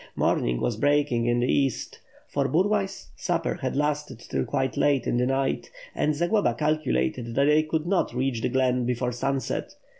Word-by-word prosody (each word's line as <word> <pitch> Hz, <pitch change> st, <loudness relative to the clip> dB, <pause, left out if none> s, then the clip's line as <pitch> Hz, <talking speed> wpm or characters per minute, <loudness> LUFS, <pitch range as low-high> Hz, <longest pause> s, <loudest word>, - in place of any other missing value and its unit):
Morning -, -, +1 dB
was 115 Hz, -, -1 dB
breaking 140 Hz, -3 st, +2 dB
in 120 Hz, 0 st, +2 dB
the 125 Hz, -, +1 dB
east, 135 Hz, -2 st, 0 dB, 0.3 s
for 140 Hz, -1 st, 0 dB
Burlay's 195 Hz, +4 st, 0 dB
supper -, -, -1 dB
had -, -, -2 dB
lasted 150 Hz, -2 st, -1 dB
till -, -, -3 dB
quite 135 Hz, -2 st, -1 dB
late 140 Hz, -4 st, +2 dB
in -, -, 0 dB
the 125 Hz, +1 st, +2 dB
night; 135 Hz, -, -1 dB, 0.2 s
and 150 Hz, 0 st, 0 dB
Zagloba 175 Hz, -, +1 dB
calculated 125 Hz, -, 0 dB
that 140 Hz, -, +3 dB
they 150 Hz, +1 st, +5 dB
could 155 Hz, 0 st, -2 dB
not 190 Hz, +1 st, +1 dB
reach 125 Hz, -1 st, -1 dB
the -, -, 0 dB
glen 125 Hz, -1 st, +1 dB
before 125 Hz, 0 st, -1 dB
sunset. 135 Hz, +2 st, -2 dB
135 Hz, 175 wpm, -26 LUFS, 120-150 Hz, 0.3 s, they